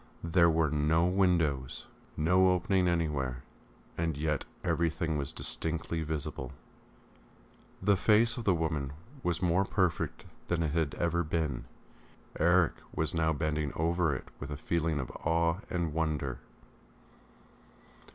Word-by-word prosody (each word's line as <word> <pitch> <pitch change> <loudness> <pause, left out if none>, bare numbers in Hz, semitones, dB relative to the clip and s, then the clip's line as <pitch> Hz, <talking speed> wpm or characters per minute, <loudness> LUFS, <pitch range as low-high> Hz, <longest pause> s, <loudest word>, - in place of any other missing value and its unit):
There 85 0 +4
were 80 -2 +2
no 80 +3 +2
windows, 85 -8 +1 0.3
no 90 +4 +4
opening 90 +1 +1
anywhere, 75 -7 -1 0.6
and 80 -3 -1
yet 75 -1 -1 0.2
everything 80 -1 0
was 70 -2 -2
distinctly 80 0 -1
visible. 75 -5 -4 1.3
The 100 +1 +4
face 110 +3 +4
of 120 - -5
the 95 -4 +3
woman 75 -4 -2 0.3
was 90 -3 -1
more 90 +2 +3
perfect 95 -3 -1 0.2
than 85 -1 0
it 80 - 0
had 80 -2 0
ever 85 0 0
been. 80 -5 -2 0.7
Eric 85 0 +4 0.2
was - - 0
now 80 -1 +2
bending 75 -1 -1
over 80 -2 +1
it - - -7
with 70 - -6
a 75 - -4
feeling 80 0 0
of 65 - -4
awe 85 +1 +2
and 85 -3 -1
wonder. 75 -5 -1
80 Hz, 130 wpm, -31 LUFS, 75-85 Hz, 1.3 s, There